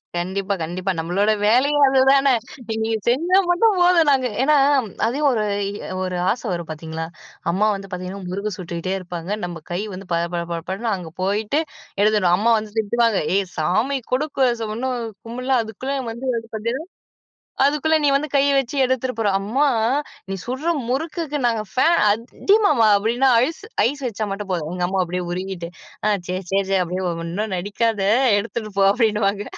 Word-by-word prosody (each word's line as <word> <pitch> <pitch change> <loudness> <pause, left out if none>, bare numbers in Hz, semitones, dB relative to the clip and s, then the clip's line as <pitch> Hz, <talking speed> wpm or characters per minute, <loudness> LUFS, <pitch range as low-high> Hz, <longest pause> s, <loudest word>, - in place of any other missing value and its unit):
கண்டிப்பா. 190 +3 -2
கண்டிப்பா. 180 +4 -2
நம்மளோட 185 +6 +1 0.2
வேலையே 275 +6 +3
அதுதானே! 270 0 +4 0.4
நீங்க 220 0 -1 0.2
செஞ்சா 320 +10 +1 0.2
மட்டும் 420 +2 +3
போதும் 350 -3 +5
நாங்க 260 -2 +3 0.2
ஏன்னா 300 +2 +4 0.5
அதையும் 285 +5 +1
ஒரு 220 -3 0 0.3
இ - - -6 0.3
ஒரு 185 -1 -2
ஆசை 245 +2 -3
வரும் 170 -2 -4
பார்த்தீங்களா! 160 +1 -5 0.4
அம்மா 195 +5 +2
வந்து 195 0 -7
பார்த்தீங்கன்னா 185 +2 -5
முருக்கு 200 +2 -3
சுட்டுக்கிட்டே 180 +1 -4
இருப்பாங்க, 175 -1 -7
நம்ம 175 -2 -6
கை 175 - -1
வந்து 195 +1 -9
பட 170 0 +1
பட 170 - -1
பட 170 - -2
படன்னு 220 +5 -2
அங்கே 175 -4 -7
போயிட்டு 210 +8 0 0.4
எழுதணும். 205 -4 +3
அம்மா 230 +4 +3
வந்து 215 -1 -7
திட்டுவாங்க, 225 0 +2 0.2
ஏய்! 200 - +1
சாமி 215 - +1
கொடு 255 +4 +2 0.4
ஸ - - -2
இன்னும் 255 0 -2 0.3
கும்பிடல. 250 +3 -3
அதுக்குள்ள 225 +5 -5 0.2
வந்து 235 +4 -6 0.3
பார்த்தீங்கன்னா, 230 +7 -3 0.8
அதுக்குள்ள 300 +2 +2
நீ - - +4
வந்து 290 +2 0
கைய 280 0 +4
வச்சு 270 +1 -4
எடுத்துட்டு 260 -1 -1
போறா! 210 -3 +2
அம்மா! 255 +9 +1 0.6
நீ 195 - -2
சுடுற 265 +7 -2 0.2
முறுக்குக்கு 305 +2 -2
நாங்க 225 -2 0
ஃபேன் 325 +7 +3
அதிமாவா 265 - +2
அப்பிடின்னா 235 +6 +2 0.2
ஐஸ், 320 +7 -6 0.3
ஐஸ் 280 +2 -5
வச்சா 215 -2 -3
மட்டும் 200 0 -5
போதும், 165 -4 -2
எங்க 180 0 -3
அம்மா 190 +1 -1
அப்பிடியே 180 +1 -3
உருகிட்டு, 185 -1 -4 0.4
ஆ - - +3 0.2
சரி, 185 +1 -3
சரி, 195 +1 +2
சரி. 195 -1 +3
அப்பிடியே 180 +2 -3 0.2
ஒன்னும் 190 +5 -3
நடிக்காத! 205 +3 -1 0.4
எடுத்துட்டு 215 0 -5
போ! 195 - +4
அப்பிடின்னுவாங்க. 210 -2 +1
215 Hz, 160 wpm, -21 LUFS, 185-260 Hz, 0.8 s, போதும்